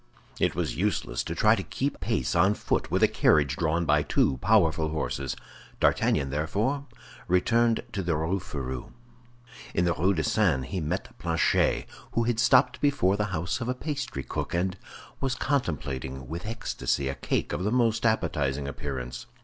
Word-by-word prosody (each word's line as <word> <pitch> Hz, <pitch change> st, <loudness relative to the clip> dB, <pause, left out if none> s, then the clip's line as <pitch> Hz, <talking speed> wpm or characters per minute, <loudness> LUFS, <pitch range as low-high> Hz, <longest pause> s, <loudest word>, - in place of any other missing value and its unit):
It -, -, +1 dB
was -, -, -1 dB
useless 90 Hz, -9 st, -1 dB
to -, -, -4 dB
try -, -, +5 dB
to -, -, -3 dB
keep -, -, -3 dB
pace 65 Hz, -, -1 dB
on 95 Hz, +5 st, +4 dB
foot -, -, -1 dB
with -, -, +1 dB
a -, -, +8 dB
carriage 70 Hz, -2 st, +3 dB
drawn 80 Hz, +1 st, 0 dB
by 75 Hz, -1 st, +4 dB
two 70 Hz, -2 st, +1 dB
powerful 80 Hz, +4 st, +3 dB
horses. 70 Hz, -4 st, -2 dB, 0.4 s
D'Artagnan 70 Hz, -1 st, +2 dB
therefore 105 Hz, -, -1 dB, 0.4 s
returned 115 Hz, +6 st, +3 dB
to 100 Hz, -, -1 dB
the 85 Hz, -3 st, 0 dB
Rue 80 Hz, +5 st, 0 dB
Férou. 65 Hz, -6 st, -6 dB, 0.8 s
In 90 Hz, -, +2 dB
the 85 Hz, -, +2 dB
Rue 95 Hz, +5 st, +2 dB
de 80 Hz, -, 0 dB
Seine 65 Hz, -1 st, +2 dB
he 95 Hz, +5 st, -3 dB
met 85 Hz, +5 st, -3 dB
Planchet, 80 Hz, -1 st, +2 dB, 0.3 s
who 115 Hz, -, +2 dB
had 115 Hz, -1 st, 0 dB
stopped 125 Hz, +1 st, +4 dB
before 140 Hz, -10 st, +3 dB
the 105 Hz, +1 st, 0 dB
house 90 Hz, +3 st, -2 dB
of 120 Hz, -, -2 dB
a 125 Hz, -, 0 dB
pastry 135 Hz, -, -4 dB
cook, -, -, -4 dB
and 90 Hz, +1 st, 0 dB, 0.4 s
was 135 Hz, -2 st, -1 dB
contemplating 70 Hz, -, -2 dB
with 85 Hz, +8 st, -5 dB
ecstasy 110 Hz, -, -2 dB
a 70 Hz, -, -1 dB
cake -, -, -2 dB
of -, -, -2 dB
the 105 Hz, -, 0 dB
most 115 Hz, -2 st, +2 dB
appetizing 75 Hz, -, 0 dB
appearance. 65 Hz, -3 st, -5 dB
85 Hz, 170 wpm, -27 LUFS, 70-110 Hz, 0.8 s, a